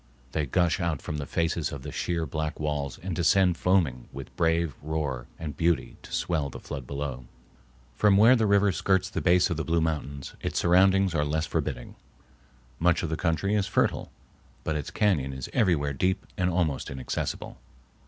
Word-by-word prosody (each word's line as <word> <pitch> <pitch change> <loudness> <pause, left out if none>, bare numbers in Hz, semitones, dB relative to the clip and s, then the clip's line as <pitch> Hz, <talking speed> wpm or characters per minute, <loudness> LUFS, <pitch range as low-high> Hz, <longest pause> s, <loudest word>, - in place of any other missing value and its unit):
They 75 -1 -1
gush 85 +4 +2
out 85 -5 -1
from 75 - -5
the 70 -1 -5
faces 85 -1 -1
of 70 -2 -7
the 75 - -6
sheer 85 +1 -1
black 75 +1 -3
walls 75 -3 -2
and 95 -2 -3
descend 90 +2 +3
foaming 85 -9 +1
with 65 0 -9
brave 80 -2 +1
roar 70 -5 -3
and 75 -3 -6
beauty 85 0 0
to - - -13
swell 80 -5 -1
the - - -9
flood 65 -2 -7
below. 70 -3 -4 0.7
From 100 - +4
where 115 +5 +7
the 110 -3 +2
river 100 0 +4
skirts 95 +1 +1
the - - -2
base 90 +1 +4
of 85 - -1
the 80 - -1
Blue 85 +1 +1
Mountains 75 -4 -3
its - - -3
surroundings 95 +1 +4
are 75 -2 +1
less 80 +2 0
forbidding. 75 -7 -3 0.9
Much 85 0 +3
of 85 - -1
the - - +1
country 85 +4 0
is 100 -2 +1
fertile, - - 0 0.5
but 80 - -1
its 75 - -3
cañon 70 -11 +1
is 65 - -6
everywhere 75 -8 +2
deep 95 +8 0
and 90 0 +1
almost 85 -6 0
inaccessible. 65 -1 -4
80 Hz, 185 wpm, -27 LUFS, 70-90 Hz, 0.9 s, where